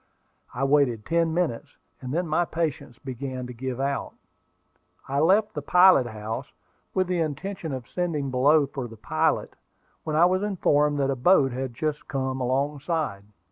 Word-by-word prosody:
I 130 - -2
waited 135 -6 +2
ten 165 0 +1
minutes; 165 -8 -2 0.2
and 130 -1 -6
then 175 +5 0
my 160 +3 +2
patience 160 -8 -3
began 130 -1 -6
to 125 - -8
give 130 +1 -5
out. 140 0 -2 0.9
I 140 +1 0
left 200 +7 +3
the 150 - -4
pilot 180 -4 +5
house, 110 0 -6 0.4
with 185 - +2
the 180 -1 -1
intention 165 +2 -3
of 130 -3 -5
sending 155 -6 -2
below 145 +4 +4
for 135 -2 -6
the 115 -1 -12
pilot, - - 0 0.5
when 155 -1 -3
I 165 +3 +6
was 185 +1 +2
informed 150 -8 +2
that 135 0 +1
a - - -1
boat 135 0 +4
had 130 -1 -4
just 150 +2 -3
come 130 -1 -2
alongside. 140 - -1
140 Hz, 165 wpm, -25 LUFS, 130-165 Hz, 0.9 s, I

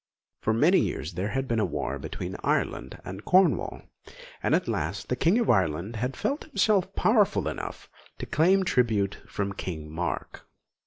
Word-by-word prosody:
For 110 - +1
many 155 - +4
years 80 +7 -2
there 90 +4 -2
had 135 +4 -2
been 115 -3 +1
war - - -3
between - - -5
Ireland 65 - -1
and 95 +3 -7
Cornwall, 185 +1 +3 0.6
and - - +3
at - - 0
last - - -2
the - - +1
King 175 +7 +3
of 235 - +1
Ireland 95 +2 0
had 125 +3 -2
felt 285 +2 -2
himself 200 - +1
powerful 200 - +3
enough 80 - -5 0.3
to - - -5
claim 185 +5 +3
tribute 110 - +1
from 100 -1 -3
King 80 -5 -6
Mark. 85 +3 -4
115 Hz, 160 wpm, -27 LUFS, -, 0.6 s, many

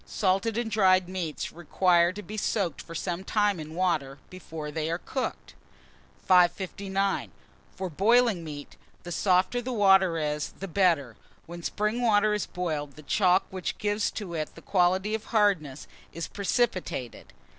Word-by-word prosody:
Salted 200 +3 0
and 235 -2 -2
dried 185 -3 +4
meats 180 -4 -4
require 175 +1 +2
to 210 +3 -8
be 215 - -8
soaked 200 -6 -1
for 165 - -10
some 175 +2 -3
time 205 -3 +1
in 155 +1 -8
water 155 -7 0
before 160 -4 -7
they 155 +1 -2
are 170 - 0
cooked. 65 - -5 0.7
559. 190 +2 +2 0.5
FOR 190 - -3
BOILING 210 +2 +3
MEAT, 145 -2 -9 0.3
the 175 - -7
softer 185 +7 +2
the 255 +2 -4
water 190 -6 +4
is, 150 -1 -2
the 195 - -7
better. 165 - +1 0.3
When 170 +1 -9
spring 210 +7 -1
water 215 -2 +3
is 210 - -2
boiled, 155 -6 -4
the 155 - -13
chalk 185 +3 +3
which 185 -1 -4
gives 205 0 0
to 195 -5 -6
it 155 -2 -4
the - - -13
quality 185 +2 +2
of 220 0 -3
hardness, 190 - +1 0.3
is 165 0 -5
precipitated. 195 - -2
185 Hz, 155 wpm, -27 LUFS, 165-205 Hz, 0.7 s, dried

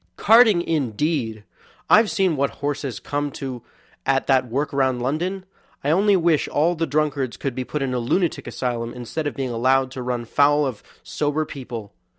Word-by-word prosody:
Carting, 220 -5 +6
indeed! 130 -6 -1 0.4
I've 215 0 +6
seen 190 -5 +1
what 140 0 +1 0.2
horses 140 -6 -3
come 145 0 -2
to 130 -3 -6 0.4
at 135 0 +1
that 130 -2 +3
work 140 +6 -2
round 130 -2 +1
London. 175 +9 -2 0.4
I 145 - +1
only 200 +4 +4
wish 170 -4 +2
all 160 +4 +2
the 165 -1 -2
drunkards 145 -3 -1
could 135 - -3
be 130 - -3
put 145 +2 -3
in 130 -1 -2
a 125 - 0
lunatic 165 +9 0
asylum 120 -2 -3
instead 125 +6 -4
of - - -4
being 135 -3 -3
allowed 130 +3 +2
to 130 -1 -6
run 125 -1 -3
foul 145 +4 +3
of 125 -6 -4 0.2
sober 150 +1 -1
people. 120 -8 -8
140 Hz, 175 wpm, -22 LUFS, 125-155 Hz, 0.4 s, Carting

